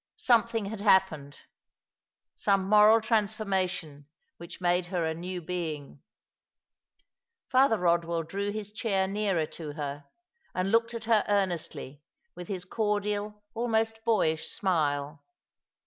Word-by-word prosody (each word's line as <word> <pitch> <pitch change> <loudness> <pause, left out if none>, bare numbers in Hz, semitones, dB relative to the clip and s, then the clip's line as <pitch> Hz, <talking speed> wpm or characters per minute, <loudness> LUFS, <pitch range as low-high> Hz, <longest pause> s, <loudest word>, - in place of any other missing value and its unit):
Something 230 -3 +2
had 205 0 -6
hap 190 -2 +5
pened 145 -3 -10 0.5
— - - -65 0.3
some 195 -2 +1
moral 215 +2 +6
transformation 190 - -1 0.3
which 170 +1 -10
made 175 0 +1
her 175 -2 -1
a 160 - -1
new 180 +2 -5
being. 160 -4 -5 1.5
Father 260 -3 +4
Eodwell 170 -2 +1
drew 200 +4 -3
his 210 0 -5
chair 200 -3 0
nearer 195 -5 0
to 155 -1 -8
her, 145 -1 -5 0.5
and 185 +2 0
looked 230 +1 +2
at 230 - -5
her 225 -2 +3
earnestly 175 -8 -2 0.3
with 175 0 -8
his 185 -3 -4
cordial, 210 0 -2
almost 225 -1 -1
boyish 165 -9 +1
smile. 150 -5 -1
190 Hz, 125 wpm, -28 LUFS, 165-215 Hz, 1.5 s, moral